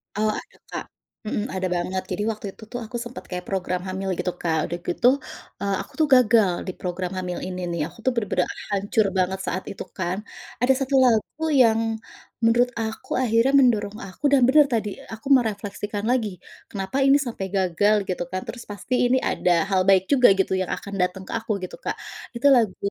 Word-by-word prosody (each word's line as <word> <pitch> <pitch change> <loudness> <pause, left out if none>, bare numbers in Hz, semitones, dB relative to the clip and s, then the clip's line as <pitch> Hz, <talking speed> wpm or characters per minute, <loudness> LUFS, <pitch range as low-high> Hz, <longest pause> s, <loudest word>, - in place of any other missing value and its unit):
Eee, 215 0 +2
ada, - - -8
Kak. - - -4 0.4
Mhm, 210 -1 -1
ada 185 0 -1
banget. 185 +2 -1
Jadi 195 +3 -1
waktu 215 -1 -8
itu - - -15
tuh 245 - -3
aku 240 +3 -9
sempet 240 +1 -8
kayak 180 -1 -5
program 180 -2 -1
hamil 190 +1 -4
gitu, 180 - -1
Kak. 160 -2 0
Udah 175 +1 -4
gitu, 205 +7 +2 0.5
eee, 200 0 0
aku - - -12
tuh 310 - +4
gagal 225 -6 +5 0.2
di - - -1
program 180 0 -3
hamil 180 -1 -3
ini 185 0 -5
nih. 170 -2 -2
Aku 175 - -18
tuh 260 - +4
bener-bener 195 -5 0 0.2
hancur 205 +2 +1
banget 185 +1 +1
saat 185 - -2
itu 195 - -6
kan. 185 0 -1 0.4
Ada 255 +2 +5
1 270 +1 0
lagu 245 +6 +1
yang 230 -5 +5 0.6
menurut 235 +2 +3
aku 220 0 -5
akhirnya 235 +1 +3
mendorong 215 -5 +2
aku 190 +10 -15
dan 260 -3 +6
benar 295 +2 +6
tadi 215 -5 -1
aku 225 +3 -8
merefleksikan 205 -3 -1
lagi 220 -6 0 0.3
kenapa 200 +6 -2
ini 275 +1 +6
sampai 235 -9 -4
gagal 195 +2 +2
gitu 180 -1 -2
kan. 185 0 -3
Terus 240 -1 -7
pasti 205 +5 -5 0.2
ini 260 - +4
ada 175 -8 +1
hal 190 -2 +2
baik 190 -1 +5
juga 255 -5 +7
gitu 190 - +2
yang 185 - -3
akan 200 - -5
datang 180 +1 -1
ke - - -6
aku 225 -2 -1
gitu, 185 - -6
Kak. - - -3 0.4
Itu 265 - +3
lagu 230 -6 +3
205 Hz, 195 wpm, -24 LUFS, 185-235 Hz, 0.6 s, juga